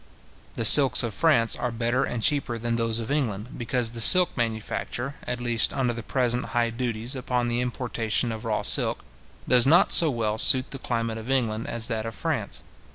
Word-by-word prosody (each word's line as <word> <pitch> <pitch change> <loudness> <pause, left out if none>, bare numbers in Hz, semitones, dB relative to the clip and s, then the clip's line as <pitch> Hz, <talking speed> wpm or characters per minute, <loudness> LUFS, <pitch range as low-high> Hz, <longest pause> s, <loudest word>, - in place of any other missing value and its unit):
The 115 - -2
silks 135 +3 +8
of 115 -3 -5
France 115 -3 +1
are 125 - -4
better 120 +3 -2
and 120 -4 -5
cheaper 140 -4 -1
than 115 +1 -3
those 115 -1 -2
of 115 +2 -6
England, 120 -6 -3
because 120 0 -2
the 115 -1 -5
silk 180 +9 +5
manufacture, 120 +3 -5
at 125 0 -4
least 120 -2 +1
under 130 -3 -2
the 115 - -7
present 125 +1 -2
high 120 -2 -2
duties 120 +1 -4
upon 125 -1 -3
the 120 +1 -2
importation 120 -2 -3
of 110 -1 -8
raw - - -3
silk, - - 0 0.4
does 125 0 +3
not 165 +5 +3
so 165 - +6
well 110 -4 -3
suit 130 +2 +6
the 135 - -6
climate 115 -2 -4
of 110 +3 -11
England 115 -4 -2
as 115 -1 -3
that 110 -1 -4
of 115 - -8
France. - - -5
120 Hz, 195 wpm, -24 LUFS, 115-125 Hz, 0.4 s, silks